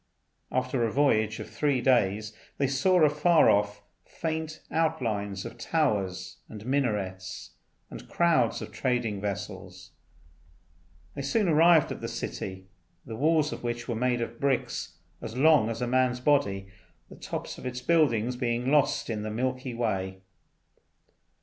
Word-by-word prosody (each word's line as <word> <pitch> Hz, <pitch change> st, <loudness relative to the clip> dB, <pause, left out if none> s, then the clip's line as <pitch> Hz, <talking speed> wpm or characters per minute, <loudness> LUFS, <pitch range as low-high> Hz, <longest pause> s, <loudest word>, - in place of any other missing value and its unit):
After 130 Hz, -1 st, 0 dB
a 115 Hz, -, 0 dB
voyage 110 Hz, -6 st, +2 dB
of -, -, -6 dB
three 145 Hz, -4 st, 0 dB
days 110 Hz, -4 st, +2 dB, 0.2 s
they 140 Hz, -, +1 dB
saw 155 Hz, +7 st, +3 dB
afar 150 Hz, +2 st, +5 dB
off 105 Hz, 0 st, 0 dB, 0.2 s
faint 160 Hz, -1 st, -4 dB
outlines 105 Hz, -11 st, -1 dB
of 120 Hz, -, -9 dB
towers 100 Hz, -, -1 dB
and 105 Hz, -1 st, -9 dB
minarets, 105 Hz, -9 st, -2 dB, 0.4 s
and -, -, -10 dB
crowds 165 Hz, -9 st, +2 dB
of -, -, -9 dB
trading 115 Hz, -3 st, -1 dB
vessels. 95 Hz, -3 st, -6 dB, 1.2 s
They -, -, -5 dB
soon 190 Hz, +10 st, +1 dB
arrived 165 Hz, 0 st, +5 dB
at -, -, -6 dB
the -, -, -3 dB
city, 95 Hz, -1 st, -5 dB, 0.4 s
the 110 Hz, -, -6 dB
walls 155 Hz, +3 st, +2 dB
of -, -, -7 dB
which 120 Hz, 0 st, -4 dB
were 120 Hz, -, -1 dB
made 120 Hz, +1 st, 0 dB
of 115 Hz, 0 st, -5 dB
bricks 140 Hz, -2 st, -1 dB, 0.2 s
as 110 Hz, -, -6 dB
long 145 Hz, -5 st, +5 dB
as 115 Hz, +2 st, -3 dB
a -, -, -1 dB
man's 125 Hz, 0 st, +2 dB
body, 125 Hz, -9 st, +1 dB, 0.4 s
the -, -, -12 dB
tops -, -, -6 dB
of -, -, -6 dB
its 125 Hz, 0 st, -5 dB
buildings 125 Hz, -7 st, +2 dB
being 125 Hz, +1 st, -1 dB
lost 150 Hz, -2 st, +2 dB
in 110 Hz, -3 st, -3 dB
the 110 Hz, -, -4 dB
Milky 130 Hz, +2 st, -2 dB
Way. 95 Hz, -5 st, -2 dB
120 Hz, 145 wpm, -28 LUFS, 105-140 Hz, 1.2 s, afar